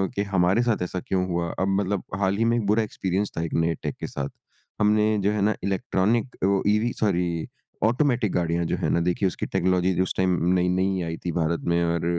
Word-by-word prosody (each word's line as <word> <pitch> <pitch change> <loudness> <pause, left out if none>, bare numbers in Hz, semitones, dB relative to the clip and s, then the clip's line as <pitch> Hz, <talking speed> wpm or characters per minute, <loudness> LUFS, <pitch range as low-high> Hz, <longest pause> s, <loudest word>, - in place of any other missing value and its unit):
कि 100 - 0
हमारे 95 +4 +3
साथ 115 -6 0
ऐसा 90 +1 -3
क्यों 90 +1 -1
हुआ। 85 -1 -1
अब 95 - +1
मतलब 100 -1 -2 0.2
हाल 95 0 +1
हीं 115 - +2
में 115 +1 +2
एक 110 - -1
बुरा 110 +2 +3
एक्सपीरियंस 100 -1 -2
था 80 - 0
एक 85 - -4
नए 85 0 +1
टेक - - -3
के - - -4
साथ। 70 -1 -4 0.5
हमने 105 0 +3
जो 100 - +3
है 105 - -1
ना 105 +2 +3
इलेक्ट्रॉनिक 100 +5 0
वो 100 0 +3
ईवी 105 +3 +2
सॉरी 90 -5 0 0.4
ऑटोमैटिक 120 -2 +2
गाड़ियाँ 85 -1 0
जो - - 0
है - - -1
ना - - +2
देखिए 90 +3 +1
उसकी 90 - -3
टेक्नोलॉजी 90 0 +1
उस 95 - -1
टाइम 90 -2 +2 0.2
नई-नई 95 +1 +1
आई 80 0 -4
थी 85 - 0
भारत 85 0 0
में 85 - +2
और 85 0 0
95 Hz, 215 wpm, -25 LUFS, 85-105 Hz, 0.5 s, हमारे